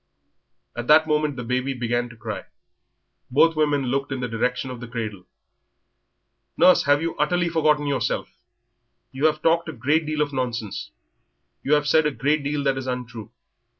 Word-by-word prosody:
At 120 0 -5
that 155 +1 +6
moment 150 -2 0
the 125 - -5
baby 130 +3 -1
began 120 0 -1
to 115 - -13
cry; 110 -2 -6 0.8
both 165 +5 +4
women 145 -2 +1
looked 135 +2 -2
in 135 - -2
the 125 - -2
direction 125 +3 -2
of 125 - -7
the 120 - -8
cradle. 110 -5 -6 1.3
"Nurse, 185 -4 +5
you - - +4 0.2
have 160 - -11
utterly 170 +3 +1
forgotten 150 -2 +2
yourself, 140 -4 -1 0.8
you 140 +4 +2
have 155 0 -2
talked 165 0 +2
a - - -5
great 150 +6 0
deal 155 -1 -1
of 145 -1 -6
nonsense, 115 - -3 0.7
you 145 - +1
have 150 0 0
said 155 0 +4
a - - 0
great 145 +2 0
deal 145 0 -2
that 135 -1 +1
is 130 - -7
untrue. 120 -3 -5
135 Hz, 175 wpm, -23 LUFS, 120-150 Hz, 1.3 s, that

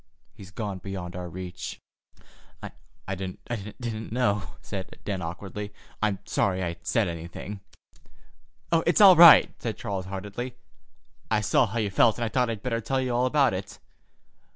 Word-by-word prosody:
He's 95 - -12
gone 100 -1 -5
beyond 90 -2 -6
our 90 -1 -5
reach." 90 +1 -7 0.8
"I - - -7 0.4
didn't 110 +4 -6
know," 105 -5 0
said 95 -3 -7
Dan 100 -3 -2
awkwardly. 100 +5 -6 0.3
"I'm 105 -3 +1
sorry 95 -1 0
I 85 -1 -3
said 95 +5 +1
anything——" 85 +4 -6 1.1
"It's 165 +3 +3
all 195 -3 +10
right," 170 -1 +9
said 115 -2 -3
Charles 95 -2 -4
heartily. 105 +6 -5 0.7
"I 110 -1 +2
saw 110 +4 +3
how 110 +3 -5
you 105 -3 0
felt, 110 +3 +4
and 120 - -1
I - - -2
thought 125 +2 +1
I'd 110 -3 -4
better 115 -2 -1
tell 130 +4 -1
you 130 -2 -1
all 125 +1 +2
about 140 -2 +3
it. 95 +1 -6
105 Hz, 155 wpm, -26 LUFS, 95-120 Hz, 1.1 s, all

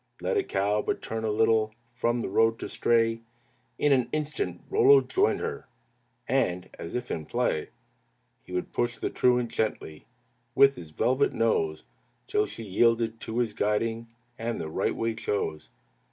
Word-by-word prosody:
Let - - -1
a 405 - +3
cow 105 - 0
but - - -2
turn 110 0 -4
a 110 - 0
little 110 0 +2 0.2
From 120 -1 0
the - - -2
road 115 +3 +3
to - - -5
stray, 115 -1 +2 0.6
In 145 -1 +3
an 125 -3 +2
instant 155 - -3
Rollo 420 0 +6
joined 400 +3 +1
her, - - -4 0.6
And, 90 -9 0
as 85 - -6
if 125 0 -3
in 80 -2 -4
play. - - -1 0.7
He - - -16
would 90 0 -3
push 120 0 -1
the - - -3
truant 125 -2 +2
gently 90 -8 -3 0.5
With 140 0 +7
his 85 -9 -10
velvet 125 - +1
nose, 80 -9 0 0.4
Till 105 - +1
she 115 - -8
yielded 115 +2 +2
to 110 - -5
his 120 -3 0
guiding, 115 +3 -1 0.3
And 115 0 -2
the 80 - -4
right - - -1
way 115 0 -1
chose. 100 -8 -3
115 Hz, 165 wpm, -27 LUFS, 105-125 Hz, 0.7 s, With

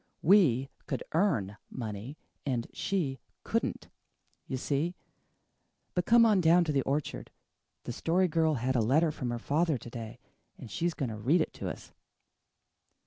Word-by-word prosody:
"We 150 - +5 0.2
COULD - - -2
earn 115 - +1
money 115 +3 -6 0.3
and 125 -4 -1
she 150 -10 -1 0.2
COULDN'T. - - -2 0.6
You 130 - -2
see? 150 +7 -1 1.0
But 180 -1 -1
come 235 0 +7
on 210 -4 +4
down 170 +1 +5
to 160 - -1
the 140 -2 +2
orchard. 140 +2 -2 0.5
The - - -5
Story 180 +8 +2
Girl 160 -1 +2
had 130 +1 -1
a 120 - +3
letter 150 +8 +3
from 130 -5 -4
her 120 - -2
father 150 +5 +1
to 120 - -10
day 115 0 -7 0.4
and 120 -5 -10
she's 170 - -1
going 135 -5 -2
to 110 - -5
read 135 +12 +3
it - - -2
to - - -4
us." - - -9
145 Hz, 160 wpm, -30 LUFS, 120-170 Hz, 1.0 s, come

